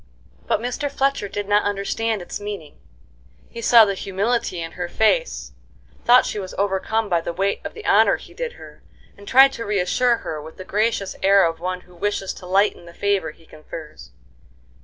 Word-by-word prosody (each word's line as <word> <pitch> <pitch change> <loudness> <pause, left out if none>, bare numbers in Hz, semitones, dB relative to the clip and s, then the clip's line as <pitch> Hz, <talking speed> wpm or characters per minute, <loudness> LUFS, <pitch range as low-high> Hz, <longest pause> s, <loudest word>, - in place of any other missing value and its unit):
But - - +1
Mr. 250 +5 -3
Fletcher 275 -6 0
did 205 0 -5
not 205 0 +4
understand 205 +1 -1
its - - -6
meaning; 205 - -7 0.7
he 230 - -7
saw 230 0 +7
the 200 - -1
humility 195 0 -1
in 165 0 -5
her 175 -1 -5
face, - - +1 0.5
thought 245 +1 +6
she 210 - -3
was 185 -2 -7
overcome 205 +3 0
by 175 -4 +1
the 170 - -4
weight 195 +3 -1
of - - -7
the 440 - -10
honor - - +5
he - - -14
did 485 -1 -4
her, - - -14 0.3
and 200 0 -15
tried 270 +1 +7
to 230 - -5
reassure 210 +5 +1
her 155 -1 -4
with 160 +2 -12
the 185 - -8
gracious 210 -1 0
air 195 0 +5
of 165 -1 -2
one 180 +1 -3
who 180 0 -20
wishes 195 +1 -2
to 180 - -11
lighten 195 -1 +1
the 170 - -13
favor 200 -5 0
he 165 +1 -16
confers. 155 0 -11
200 Hz, 190 wpm, -22 LUFS, 180-225 Hz, 0.7 s, saw